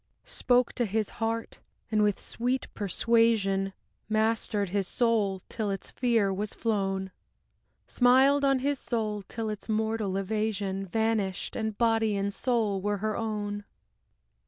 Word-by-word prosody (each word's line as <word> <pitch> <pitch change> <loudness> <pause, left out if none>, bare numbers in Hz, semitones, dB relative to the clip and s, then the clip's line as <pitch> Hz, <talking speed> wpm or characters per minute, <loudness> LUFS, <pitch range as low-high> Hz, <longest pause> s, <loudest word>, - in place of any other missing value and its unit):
Spoke 250 0 +2
to 240 -2 0
his 215 +1 -1
heart, 225 0 -2 0.3
and 215 -1 +3
with 205 -2 +2
sweet 250 +3 -2
persuasion 205 -2 +2 0.4
Mastered 215 -2 +1
his 195 0 0
soul 210 -6 +1
till 220 -3 -3
its 195 -1 -4
fear 230 -6 +2
was 205 +2 -3
flown; 195 -4 -1 0.7
Smiled 265 +3 +4
on 275 -1 +4
his 285 -2 +1
soul 215 -3 -2
till 220 +3 -5
its 210 +1 -5
mortal 220 -3 0
evasion 195 -1 -2
Vanished, 220 -2 -1
and 220 -2 -2
body 225 -2 +2
and 200 0 -1
soul 220 -5 0
were 205 +1 0
her 215 +1 -2
own. 205 -2 -3
215 Hz, 135 wpm, -28 LUFS, 200-230 Hz, 0.7 s, Smiled